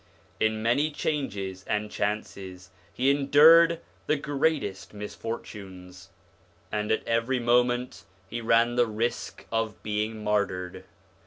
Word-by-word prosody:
In 110 Hz, 0 st, +1 dB
many 130 Hz, +7 st, +2 dB
changes 100 Hz, -12 st, -3 dB
and 105 Hz, 0 st, -1 dB
chances 95 Hz, -3 st, -4 dB, 0.2 s
he 130 Hz, +2 st, +2 dB
endured 160 Hz, +4 st, +6 dB, 0.3 s
the 155 Hz, -, +3 dB
greatest 140 Hz, -9 st, -1 dB
misfortunes, 95 Hz, -4 st, -8 dB, 0.6 s
and 105 Hz, 0 st, -1 dB
at 110 Hz, -, 0 dB
every 115 Hz, +3 st, +1 dB
moment 120 Hz, +1 st, +1 dB, 0.2 s
he 115 Hz, +4 st, -5 dB
ran 115 Hz, +1 st, +3 dB
the 120 Hz, -1 st, +4 dB
risk 115 Hz, +2 st, -3 dB
of 115 Hz, -2 st, -2 dB
being 105 Hz, +1 st, -2 dB
martyred. 95 Hz, -4 st, -1 dB
115 Hz, 110 wpm, -27 LUFS, 105-125 Hz, 0.6 s, endured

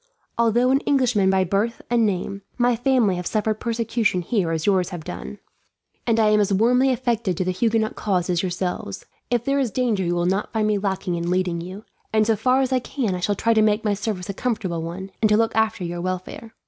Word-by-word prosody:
Although 235 Hz, +2 st, +3 dB
an 270 Hz, -, +4 dB
Englishman 250 Hz, -9 st, +2 dB
by 190 Hz, 0 st, +3 dB
birth 200 Hz, +6 st, -1 dB
and 235 Hz, -2 st, +2 dB
name, 195 Hz, 0 st, -3 dB, 0.2 s
my 245 Hz, -1 st, +3 dB
family 240 Hz, -6 st, +2 dB
have 180 Hz, -, -4 dB
suffered 215 Hz, 0 st, -1 dB
persecution 230 Hz, -5 st, 0 dB
here 190 Hz, -2 st, 0 dB
as 160 Hz, -1 st, -2 dB
yours 190 Hz, -3 st, +2 dB
have 175 Hz, -4 st, -7 dB
done, 70 Hz, -, -7 dB, 0.7 s
and 230 Hz, -1 st, +2 dB
I 215 Hz, -1 st, +4 dB
am 210 Hz, 0 st, +4 dB
as 205 Hz, -1 st, +1 dB
warmly 245 Hz, +6 st, +3 dB
affected 235 Hz, -7 st, 0 dB
to -, -, 0 dB
the 185 Hz, -, 0 dB
Huguenot 220 Hz, +3 st, 0 dB
cause 185 Hz, -4 st, -1 dB
as 175 Hz, -1 st, +1 dB
yourselves. 180 Hz, -, -4 dB, 0.2 s
If 240 Hz, -1 st, 0 dB
there 275 Hz, 0 st, +1 dB
is 260 Hz, -4 st, +1 dB
danger 220 Hz, -3 st, 0 dB
you 175 Hz, 0 st, 0 dB
will 175 Hz, 0 st, 0 dB
not 190 Hz, +3 st, -1 dB
find 220 Hz, -1 st, +1 dB
me 210 Hz, -1 st, +1 dB
lacking 195 Hz, -2 st, -2 dB
in 170 Hz, 0 st, -2 dB
leading 180 Hz, -2 st, 0 dB
you, 185 Hz, +5 st, -9 dB, 0.3 s
and 215 Hz, 0 st, +3 dB
so 225 Hz, 0 st, +2 dB
far 255 Hz, +5 st, +2 dB
as 260 Hz, 0 st, 0 dB
I 255 Hz, -, +3 dB
can 245 Hz, -4 st, -2 dB
I 180 Hz, -, -3 dB
shall 200 Hz, +3 st, 0 dB
try 230 Hz, +3 st, +2 dB
to 220 Hz, -, +4 dB
make 215 Hz, +1 st, +2 dB
my 210 Hz, -, +2 dB
service 200 Hz, -3 st, -3 dB
a 200 Hz, -, -3 dB
comfortable 195 Hz, -7 st, -2 dB
one, 180 Hz, +4 st, -6 dB
and 215 Hz, -, +4 dB
to 210 Hz, -, +4 dB
look 225 Hz, 0 st, +1 dB
after 220 Hz, -2 st, +1 dB
your 175 Hz, 0 st, -4 dB
welfare. 185 Hz, +5 st, -5 dB
210 Hz, 230 wpm, -23 LUFS, 185-230 Hz, 0.7 s, an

